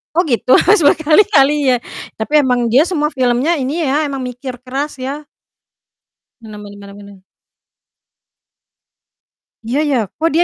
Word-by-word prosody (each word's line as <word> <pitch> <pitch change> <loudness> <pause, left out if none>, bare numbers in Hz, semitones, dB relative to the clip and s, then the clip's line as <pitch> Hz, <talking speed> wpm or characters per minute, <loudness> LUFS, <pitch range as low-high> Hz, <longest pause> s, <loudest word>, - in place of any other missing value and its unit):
Oh, 350 - +2
gitu. 255 -2 +2
Harus 400 0 +3
berkali-kali, 295 -2 +3
ya. 250 - +3 0.4
Tapi, 295 +7 +1
emang 250 -3 0
dia 235 +4 +3
semua 305 -4 -2
filmnya 255 +4 0
ini 270 +5 -3
ya, 285 +3 0
emang 270 -2 -5
mikir 250 +1 -7
keras, 270 +4 -5
ya? 270 +3 -5 1.2
Benar 215 -2 -11
benar 205 0 -11
benar 200 0 -12
benar. 200 -1 -14 2.5
Iya, 255 +5 -1
ya, 270 - +1 0.2
kok, 325 +1 +1
dia 340 - +4
270 Hz, 140 wpm, -15 LUFS, 245-300 Hz, 2.5 s, dia